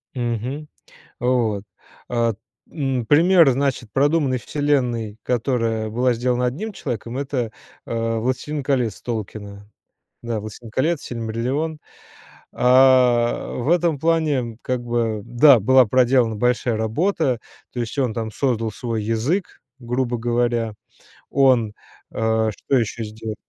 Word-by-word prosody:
Мгм. 125 Hz, +4 st, -3 dB, 0.5 s
Вот. 120 Hz, -5 st, 0 dB, 0.4 s
А, 115 Hz, -2 st, +1 dB, 0.4 s
м, 135 Hz, -5 st, -2 dB
пример, 165 Hz, +2 st, +6 dB
значит, 135 Hz, -3 st, -1 dB
продуманной 140 Hz, -1 st, +2 dB
вселенной, 125 Hz, -7 st, -1 dB
которая 115 Hz, -3 st, 0 dB
была 125 Hz, +3 st, +2 dB
сделана 125 Hz, +1 st, 0 dB
одним 185 Hz, -, -3 dB
человеком- 120 Hz, -, -5 dB
это, 130 Hz, -5 st, -2 dB, 0.4 s
а, 115 Hz, 0 st, -1 dB
"Властелин 130 Hz, +5 st, -2 dB
колец" 125 Hz, -6 st, 0 dB
Толкина. 105 Hz, -3 st, -6 dB, 0.5 s
Да, 115 Hz, -2 st, -3 dB
"Властелин 110 Hz, +2 st, -9 dB
колец", 150 Hz, +7 st, 0 dB
"Сильмариллион". 125 Hz, +7 st, -3 dB, 0.7 s
А, 125 Hz, -2 st, +4 dB
в 125 Hz, +5 st, -1 dB
этом 170 Hz, -3 st, +2 dB
плане 145 Hz, -7 st, 0 dB
как 125 Hz, -1 st, -2 dB
бы, 115 Hz, -3 st, -1 dB
да, 120 Hz, +3 st, +6 dB
была 130 Hz, +4 st, +5 dB
проделана 125 Hz, -1 st, +3 dB
большая 125 Hz, 0 st, +1 dB
работа, 130 Hz, -, 0 dB, 0.3 s
то 125 Hz, -, -4 dB
есть 120 Hz, +4 st, -4 dB
он 125 Hz, -5 st, +1 dB
там 115 Hz, -2 st, -3 dB
создал 115 Hz, -3 st, 0 dB
свой 115 Hz, -3 st, -3 dB
язык, 120 Hz, -, -1 dB, 0.2 s
грубо 125 Hz, 0 st, -1 dB
говоря. 120 Hz, -1 st, 0 dB, 0.6 s
Он, 125 Hz, -6 st, +3 dB, 0.4 s
а, 110 Hz, 0 st, +1 dB
что 135 Hz, +6 st, -1 dB
еще 115 Hz, 0 st, -3 dB
сделал? 110 Hz, 0 st, -6 dB
120 Hz, 120 wpm, -22 LUFS, 115-135 Hz, 0.7 s, пример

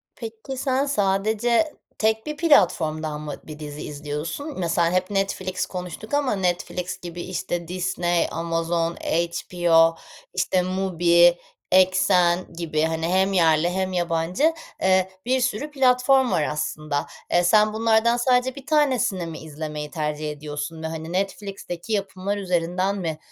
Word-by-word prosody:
Peki, 225 Hz, +3 st, -7 dB
sen 265 Hz, +1 st, +1 dB
sadece 220 Hz, +4 st, +1 dB, 0.2 s
tek 220 Hz, 0 st, +1 dB
bir 300 Hz, -1 st, -5 dB
platformdan 155 Hz, -, +2 dB
mı 150 Hz, -2 st, -5 dB
bir 155 Hz, -1 st, -10 dB
dizi 150 Hz, -1 st, -7 dB
izliyorsun? 150 Hz, -, -5 dB
Mesela 170 Hz, -1 st, +1 dB
hep 185 Hz, +1 st, 0 dB
Netflix 190 Hz, -1 st, -1 dB
konuştuk 180 Hz, -, -7 dB
ama 285 Hz, -6 st, +2 dB
Netflix 180 Hz, -1 st, -2 dB
gibi, 175 Hz, 0 st, -7 dB
işte, 175 Hz, -1 st, -4 dB
Disney, 175 Hz, -1 st, 0 dB
Amazon, 165 Hz, 0 st, -1 dB
HBO, 170 Hz, 0 st, +2 dB, 0.4 s
işte 185 Hz, +1 st, +1 dB
MUBI, 175 Hz, -2 st, +3 dB, 0.3 s
Exxen 185 Hz, -1 st, +3 dB
gibi, 165 Hz, -2 st, -2 dB
hani, 160 Hz, 0 st, 0 dB
hem 190 Hz, +2 st, +2 dB
yerli 165 Hz, -2 st, +4 dB
hem 190 Hz, +1 st, -2 dB
yabancı, 175 Hz, -, +1 dB, 0.3 s
eee, 190 Hz, 0 st, +3 dB, 0.2 s
bir 260 Hz, +2 st, +2 dB
sürü 250 Hz, +5 st, -1 dB
platform 260 Hz, -1 st, +3 dB
var 155 Hz, -, +2 dB
aslında. 150 Hz, -1 st, -2 dB, 0.3 s
Eee, 175 Hz, -, +4 dB
sen 215 Hz, +4 st, +4 dB
bunlardan 225 Hz, +1 st, +3 dB
sadece 250 Hz, +1 st, +2 dB
1 275 Hz, -, -10 dB
tanesini 255 Hz, -, +1 dB
mi 165 Hz, -1 st, -7 dB
izlemeyi 150 Hz, -1 st, -6 dB
tercih 150 Hz, -1 st, -3 dB
ediyorsun 150 Hz, +2 st, -6 dB
ve, -, -, -1 dB
hani, 160 Hz, +1 st, -6 dB
Netflix'teki 195 Hz, 0 st, -4 dB
yapımlar 200 Hz, 0 st, -2 dB
üzerinden 185 Hz, +1 st, 0 dB
mi, 165 Hz, -5 st, -3 dB
180 Hz, 135 wpm, -23 LUFS, 165-215 Hz, 0.4 s, yerli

